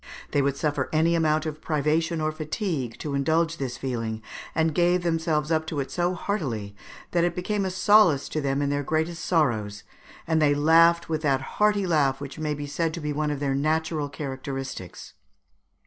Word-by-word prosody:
They 145 - +2
would 140 0 0
suffer 145 -3 -1
any 160 +2 +3
amount 155 -1 +2
of 155 -1 -5
privation 155 +2 0
or 155 0 0
fatigue 155 - -3
to 150 - -5
indulge 160 +4 +1
this 130 -4 -4
feeling, 115 -4 -3 0.3
and 160 0 +2
they - - -9
gave 175 +2 +2
themselves 160 -2 0
up 160 0 +1
to 155 -3 -3
it 135 - -3
so 175 +1 0
heartily 125 - -3 0.4
that 170 -1 +2
it 175 -1 0
became 200 +2 -1
a - - 0
solace 185 -6 +4
to 155 - -2
them 140 0 0
in 140 - 0
their 145 0 0
greatest 160 +3 -1
sorrows, 115 - 0 0.4
and 160 -1 +1
they 145 -1 +4
laughed 165 +3 +5
with 155 -1 -2
that 135 -4 +1 0.2
hearty 210 -2 +3
laugh 145 -6 +2
which 140 +2 -8
may 150 -1 -1
be 145 0 -5
said 160 +3 -2
to - - -5
be 150 -2 -3
one 150 +1 -1
of 145 -2 -2
their 140 -1 0
natural 155 +1 0
characteristics. 135 - -6
155 Hz, 195 wpm, -25 LUFS, 140-165 Hz, 0.4 s, laughed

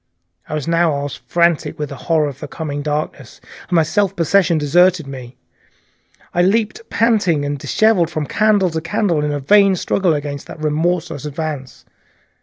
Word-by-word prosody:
I 155 - -3
was 150 -1 -4
now 165 0 +2
almost 140 0 -4
frantic 170 -2 +1
with 150 -2 -4
the 140 - -7
horror 160 -2 +3
of 140 -2 -7
the - - -6
coming 145 -3 -5
darkness, 150 +1 -4 0.3
and - - 0
my 165 - +5
self 195 +4 0
possession 170 0 +2
deserted 170 +3 +3
me. 130 -2 -9 1.0
I 175 - +2
leaped 215 - +1
panting 205 -9 +2 0.6
from 155 -2 -3
candle 210 +1 +2
to 160 0 -3
candle 170 -2 0
in 150 - -1
a 145 - -2
vain 195 +7 +4
struggle 180 -1 +1
against 145 -1 -5
that - - -9
remorseless 155 0 -1
advance. 145 -4 -6
160 Hz, 160 wpm, -18 LUFS, 145-180 Hz, 1.0 s, my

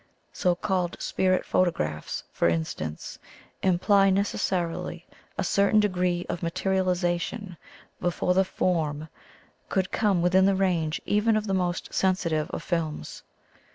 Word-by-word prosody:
So 180 -1 +1
called 180 -1 -1
spirit 185 -1 +1
photographs, 75 - -1
for - - +2
instance, 80 -2 -4 0.4
imply 195 +2 +4
necessarily 185 -3 -1 0.3
a - - 0
certain 200 +2 +3
de 210 -1 +3
gree 180 -1 0
of 175 - -4
materialization 180 +2 -1 0.4
before 175 0 0
the 190 +1 +4
'form' 155 -5 -1 0.6
could 190 -1 0
come 200 -6 +2
within 190 +2 +4
the 195 - +3
range 170 -5 0
even 215 +2 +2
of 215 - -2
the 195 - -1
most 180 -1 -1
sensitive 170 -5 +1
of - - -5
films. 160 - -3
180 Hz, 125 wpm, -26 LUFS, 170-190 Hz, 0.6 s, imply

